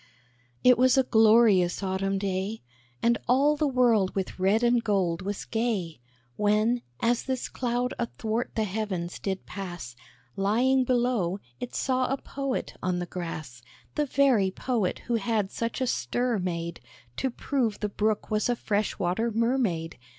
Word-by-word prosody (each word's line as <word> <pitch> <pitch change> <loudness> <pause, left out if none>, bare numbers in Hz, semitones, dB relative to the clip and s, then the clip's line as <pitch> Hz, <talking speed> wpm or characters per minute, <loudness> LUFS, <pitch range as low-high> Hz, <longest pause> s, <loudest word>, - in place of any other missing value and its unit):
It 250 -1 +6
was 255 +1 +5
a 265 - +5
glorious 220 -6 +4
Autumn 195 +1 -1
day, 195 +2 -2 0.4
And 235 0 +3
all 280 +4 +4
the 300 0 +1
world 240 -7 +3
with 190 -1 -3
red 200 +5 +3
and 240 -1 +3
gold 190 -6 +1
was 200 +1 -4
gay; 215 - -2 0.4
When, 215 +4 +2 0.2
as 240 +1 +2
this 260 -2 -3
cloud 245 0 -1
athwart 230 0 -2
the 220 - +1
heavens 190 -4 -3
did 190 -1 -3
pass, 175 -11 -7 0.4
Lying 245 +7 +2
below, 240 -8 +1 0.2
it 245 - -6
saw 255 -1 +1
a 270 - +1
Poet 275 -1 -4
on 185 -1 0
the 175 - -2
grass, 160 -8 -6 0.3
The 295 -1 0
very 255 -8 +3
Poet 215 -1 -1
who 235 -1 +1
had 210 -2 -1
such 230 +2 -3
a - - +2
stir 245 -2 0
made, 170 -2 -3 0.4
To 265 - 0
prove 240 -3 -1
the 210 - -1
Brook 210 +1 -1
was 215 +3 +1
a 245 - +2
fresh 210 -2 -1
water 190 +6 0
mermaid. 225 - 0
220 Hz, 155 wpm, -27 LUFS, 190-245 Hz, 0.4 s, It